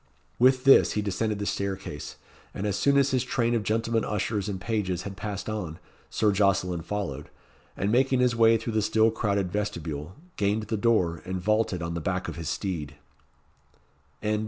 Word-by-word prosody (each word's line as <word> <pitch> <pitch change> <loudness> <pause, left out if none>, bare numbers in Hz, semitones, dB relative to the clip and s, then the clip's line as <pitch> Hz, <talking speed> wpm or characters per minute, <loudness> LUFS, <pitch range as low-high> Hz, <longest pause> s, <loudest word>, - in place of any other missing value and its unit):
With 130 +1 +5
this 135 - +6
he 105 - -1
descended 105 +2 -1
the 100 - -3
staircase; 95 -7 -4 0.4
and 95 - -3
as 100 -2 0
soon 140 +6 +3
as 140 0 +3
his 130 -2 +1
train 120 -2 0
of 115 - +1
gentlemen 115 +2 0
ushers 105 -1 -2
and 95 -2 -3
pages 95 -3 -2
had 100 -1 -6
passed 100 -1 -5
on, 90 -7 -4 0.3
Sir 105 -1 +2
Jocelyn 95 -3 +1
followed, 80 -6 -4 0.5
and 100 - 0
making 130 +2 +3
his 125 -1 +3
way 115 0 +5
through 115 0 -4
the 110 - +2
still 110 +1 +3
crowded 100 -4 -1
vestibule, 85 -5 -4 0.2
gained 105 +1 +1
the 110 +1 -2
door, 100 -7 +1
and 95 0 -4
vaulted 105 -2 0
on 85 0 -3
the 85 - -3
back 95 +3 -2
of - - -5
his 85 -2 -4
steed. 80 -7 -3
105 Hz, 180 wpm, -27 LUFS, 95-115 Hz, 0.5 s, this